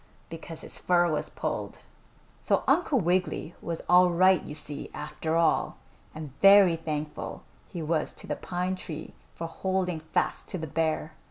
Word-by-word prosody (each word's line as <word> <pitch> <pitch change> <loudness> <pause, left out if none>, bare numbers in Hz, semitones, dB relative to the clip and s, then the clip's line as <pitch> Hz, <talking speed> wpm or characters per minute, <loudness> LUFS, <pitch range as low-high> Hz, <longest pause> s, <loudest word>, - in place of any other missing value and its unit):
because 165 0 -8
his - - -10
fur 175 -1 +3
was 155 -2 -1
pulled. - - -4 0.6
So - - +1
Uncle 315 -6 +3
Wiggily 180 -2 0
was 165 -1 -4
all 180 0 +6
right, 185 +2 +4
you 150 - -7
see, 145 -1 -7
after 150 +2 -3
all, 165 -1 +2 0.4
and 155 -4 -7
very 195 -3 +8
thankful 155 -2 -5 0.3
he 170 - -5
was 155 0 0
to - - -11
the - - -2
pine 180 +1 -2
tree 160 -4 -7 0.2
for 165 - -5
holding 180 0 -1
fast 155 - -1
to - - -4
the 160 - -4
bear. 160 +1 -1
165 Hz, 160 wpm, -28 LUFS, 155-180 Hz, 0.6 s, very